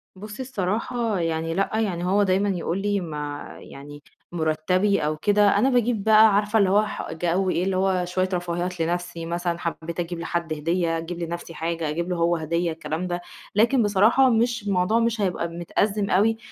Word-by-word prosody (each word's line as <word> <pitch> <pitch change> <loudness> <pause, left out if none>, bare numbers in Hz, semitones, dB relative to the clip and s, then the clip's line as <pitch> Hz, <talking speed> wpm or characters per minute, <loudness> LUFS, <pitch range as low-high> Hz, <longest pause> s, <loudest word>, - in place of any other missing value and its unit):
بُصي 210 +5 -8
الصراحة 225 -1 -2
يعني 165 -1 -1
لأ، 195 +3 0
يعني 180 -5 -1
هو 200 +3 +3
دايمًا 195 +1 +1
يقول 180 0 -2
لي 205 0 0
ما 150 -4 -5
يعني 145 +1 -12 0.3
مُرَتبي 175 +5 +1
أو 155 0 -1
كده، 205 +3 +3
أنا 245 +6 +3
باجيب 240 -4 +1
بقى 220 -1 +6
عارفة 210 +2 +2
اللي 195 -2 +3
هو 205 +2 +4
ح - - -6
جو 175 +3 0
إيه، 180 - 0
اللي 190 0 0
هو 185 -1 +1
شوية 185 +1 -1
رفاهيات 175 0 -2
لنفْسِي، 175 0 -2
مثلًا 170 0 -2
حبيت 170 0 -5
أجيب 175 0 -3
لحد 170 -1 -2
هدية، 165 +2 0
أجيب 170 +1 -6
لنفْسِي 170 0 -5
حاجة، 165 0 -3
أجيب 170 +4 -3
له 180 - -1
هو 170 0 +2
هدية، 170 +1 -1
الكلام 160 +2 -4
ده. 175 0 -3 0.3
لكن 235 +4 +4
بصراحة 215 +6 +4
مش 235 -1 +1
الموضوع 195 +4 +2
مش 230 -1 0
هيبقى 180 -3 -1
متأزّم 200 +5 -1
أوي، 220 +4 +3
180 Hz, 180 wpm, -24 LUFS, 170-205 Hz, 0.3 s, بقى